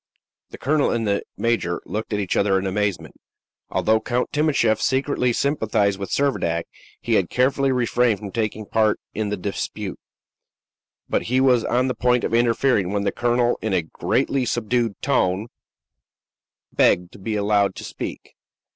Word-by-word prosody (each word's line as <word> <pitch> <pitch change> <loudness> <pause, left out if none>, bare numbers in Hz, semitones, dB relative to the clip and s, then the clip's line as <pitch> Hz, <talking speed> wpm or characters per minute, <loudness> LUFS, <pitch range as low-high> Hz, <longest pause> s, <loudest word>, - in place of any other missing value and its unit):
The - - -10
colonel 145 +2 +1
and 115 -1 -1
the 100 0 +1 0.2
major 115 -7 0
looked 110 +2 -4
at 105 - 0
each 100 -3 -1
other 100 -1 +3
in 95 - -2
amazement. 100 0 -2 0.5
Although 110 0 +2
Count 125 0 -1
Timascheff 140 -8 +2
secretly 130 -2 +1
sympathized 110 -7 0
with 100 - -5
Servadac, 85 -12 0 0.4
he 120 - -2
had 95 -5 +2
carefully 135 +2 +2
refrained 120 -2 +2
from 100 -1 -8
taking 110 -1 -2
part 110 0 +1
in 110 -1 -2
the 105 - -2
dispute; 100 +1 -4 1.1
but - - 0
he 130 +1 +2
was 125 -3 +4
on 125 +2 +1
the 130 - 0
point 125 -1 +1
of - - -2
interfering, 115 -4 +2
when 100 0 -1
the 100 - +1
colonel, 120 0 +1
in 110 -2 -1
a 90 - +2
greatly 130 - 0
subdued 120 -2 -1
tone, 95 +5 +1 1.2
begged 90 0 +3
to - - -14
be 105 +3 -3
allowed 100 -2 +2
to - - -8
speak. - - -7
110 Hz, 160 wpm, -22 LUFS, 100-125 Hz, 1.2 s, was